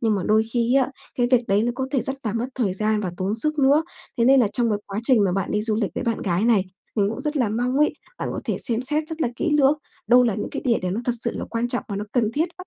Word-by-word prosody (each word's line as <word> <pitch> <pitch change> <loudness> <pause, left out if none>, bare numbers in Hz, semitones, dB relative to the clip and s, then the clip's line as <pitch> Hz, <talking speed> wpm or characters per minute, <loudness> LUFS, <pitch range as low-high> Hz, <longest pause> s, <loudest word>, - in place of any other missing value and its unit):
nhưng 225 -2 +2
mà 195 - -1
đôi 215 +1 +4
khi 240 +1 +1
á, 270 -1 +3 0.3
cái 245 - +3
việc 250 -2 +5
đấy 200 +2 +3
nó 240 - 0
có 265 +1 -2
thể 270 -4 +1
rất 265 +3 -3
là 215 - -1
mất 230 +2 -1
thời 205 -8 0
gian 215 +1 +1
và 190 -4 -3
tốn 190 +3 -1
sức 305 +7 -1
nữa. 285 +3 +4 0.3
Thế 235 - +3
nên 270 +1 +6
là 220 - +3
trong 235 -2 +1
cái 210 - 0
quá 200 +2 -4
trình 235 -5 +4
mà 185 - +1
bạn 195 0 -2
đi 210 0 0
du 220 -1 +1
lịch 215 -3 -1
với - - -3
bạn 230 -2 -1
gái 180 +2 0
này, 225 -5 +3 0.3
mình 200 -2 +2
cũng 225 - -5
rất 300 0 -2
là 245 -6 +2
mong 245 +4 -1
ấy, 300 +1 +3 0.3
bạn - - -3
có - - -4
thể - - -1
xem 235 0 -1
xét 300 +4 -1
rất 320 -1 -6
là 280 - +2
kỹ 335 - -1
lưỡng, 290 +1 +4 0.3
đâu 245 +3 +6
là 235 -4 +1
những 210 - -4
cái - - -5
địa 240 -3 +2
điểm 180 0 -1
nó 225 - -2
thật 245 - +1
sự 235 - +2
là - - -4
quan 235 +1 -1
trọng 245 0 -2
và 200 - -3
nó 205 - -3
cần 230 -3 +1
thiết, 320 +6 0
bắt 365 - -9
235 Hz, 320 wpm, -23 LUFS, 210-265 Hz, 0.3 s, nên